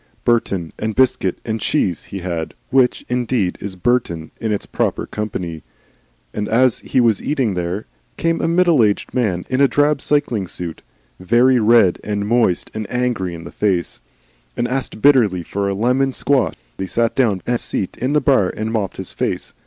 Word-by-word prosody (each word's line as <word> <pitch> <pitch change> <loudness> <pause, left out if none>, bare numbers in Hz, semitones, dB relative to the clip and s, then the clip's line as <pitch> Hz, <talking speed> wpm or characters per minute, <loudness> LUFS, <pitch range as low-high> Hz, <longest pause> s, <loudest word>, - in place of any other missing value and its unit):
Burton 100 -8 0
and 110 -1 -2
biscuit 125 -8 +2
and 110 -1 -3
cheese 95 - 0
he 100 - -7
had, 85 -3 -4 0.2
which, 130 -2 +2
indeed, 120 -6 0
is 100 -1 -5
Burton 90 -7 -1
in 110 -2 -1
its 105 - -2
proper - - -1
company; 90 -7 -5 0.7
and 105 0 -3
as 125 +2 +3
he 130 - 0
was 115 -4 +3
eating 135 -8 0
there 90 +3 -3 0.3
came 165 0 0
a - - +1
middleaged 165 - +2
man 100 -9 0
in 130 +1 0
a 140 - +7
drab 145 0 +2
cycling 125 -10 0
suit, 85 -1 -5 0.4
very 120 +7 +4
red 110 -5 +4
and 105 -1 -2
moist 115 -6 +1
and 110 -1 -5
angry 120 -8 -1
in 85 - -9
the - - -9
face, 90 -10 -1 0.6
and 120 - 0
asked 130 -4 -3
bitterly 115 -11 +4
for 100 +3 -2
a 100 - -1
lemon 125 +6 +1
squash. 135 +1 +1 0.2
And - - -1
he - - -4
sat 115 +3 0
down 120 -6 +3
upon 95 - -6
the 120 - +2
seat 95 - -3
in 130 +3 -1
the 150 - +3
bar 130 -10 +3
and 110 +1 -4
mopped 105 -4 -2
his 95 - -6
face. - - -2
110 Hz, 185 wpm, -19 LUFS, 95-130 Hz, 0.7 s, a